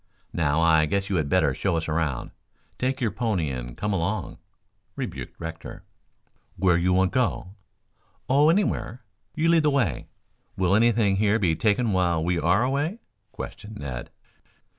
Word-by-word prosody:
Now, 80 -1 +1
I 80 -2 +4
guess 100 +4 -1
you 95 - +2
had 75 -3 -1
better - - +3
show 85 - -1
us 80 - -3
around. 75 -5 -2 0.5
Take 130 +1 -1
your 115 -5 0
pony 100 - -1
and - - -6
come 105 +1 -1
along," 95 +2 -2 0.6
rebuked - - -6
Rector. 80 0 -8 0.7
"Where 90 -2 +3
you 85 +2 +2
want 95 0 +3
go?" 120 -6 0 0.8
"Oh, 145 +4 +4
anywhere. 165 - 0 0.3
You 160 +1 +1
lead 165 -1 +5
the 150 - +3
way. 120 - 0 0.5
Will 95 0 +2
anything 110 -2 +3
here 105 +1 +3
be 90 -7 +1
taken 110 +5 +1
while 85 -3 +1
we 85 0 0
are 90 +8 +3
away?" 145 - -1 0.3
questioned 105 +1 -8
Ned. 65 -3 -6
95 Hz, 155 wpm, -25 LUFS, 80-115 Hz, 0.8 s, lead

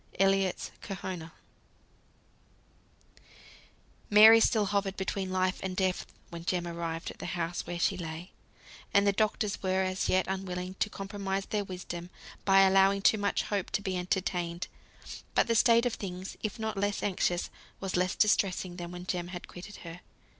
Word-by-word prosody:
ELLIOTT'S 195 -1 +2
"KERHONAH." 185 -4 -6 2.8
Mary 220 +2 +9
still 220 -1 +3
hovered 200 -1 -1
between 190 0 -2
life 185 0 +1
and 190 -1 -3
death 185 -1 0 0.2
when 170 -1 -7
Jem 175 0 -1
arrived 170 -1 -4
at - - -15
the - - -5
house 175 0 -3
where 175 - -3
she 185 +2 +1
lay; 165 +1 -6 0.6
and 200 0 +6
the 200 - +5
doctors 210 0 0
were 190 0 +1
as 185 0 -1
yet 185 0 +3
unwilling 185 -1 -3
to - - +1
compromise 195 -1 -3
their 210 -1 -1
wisdom 180 -2 -7 0.4
by 195 0 +6
allowing 195 +1 +5
too 215 - +5
much 205 0 0
hope 200 -3 -2
to - - -1
be 190 -1 -2
entertained. 180 -1 -1 0.7
But - - +4
the 230 - +1
state 235 +1 +5
of 245 - +1
things, 185 -1 -6
if 215 -3 -3
not 220 -2 -3
less 205 +1 -1
anxious, 180 -3 0 0.3
was 195 -1 -3
less 180 0 +1
distressing 190 -4 +2
than 175 -1 -6
when 180 0 -8
Jem 175 -2 -2
had 175 -1 -7
quitted 190 +3 -10
her. 165 +1 -8
190 Hz, 160 wpm, -30 LUFS, 180-200 Hz, 2.8 s, Mary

